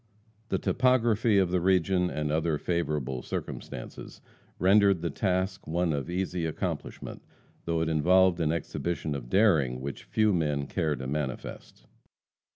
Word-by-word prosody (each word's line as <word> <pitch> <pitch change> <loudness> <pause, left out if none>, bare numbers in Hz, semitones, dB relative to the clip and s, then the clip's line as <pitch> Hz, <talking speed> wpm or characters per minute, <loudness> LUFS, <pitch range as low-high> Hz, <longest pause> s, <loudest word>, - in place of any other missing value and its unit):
The - - +1
topography 120 -4 +2
of 95 -2 +2
the 90 -1 +1
region, 90 0 +2
and 75 -1 -2
other 80 0 +1
favorable 75 -7 -2
circumstances, - - -7 0.4
rendered 100 0 +4
the 85 - -1
task 95 +1 -1
one 85 +1 0
of 70 +2 -3
easy 90 -2 -2
accomplishment, 80 - -5 0.4
though 85 -1 0
it 80 - 0
involved 90 +3 +4
an 80 -2 +1
exhibition 85 -1 -3
of 65 -4 -6
daring 80 - +3
which 70 +2 -6
few 110 -1 +2
men 75 -5 0
care 80 0 -1
to 65 - -7
manifest. 70 -1 -5
85 Hz, 140 wpm, -28 LUFS, 75-95 Hz, 0.4 s, rendered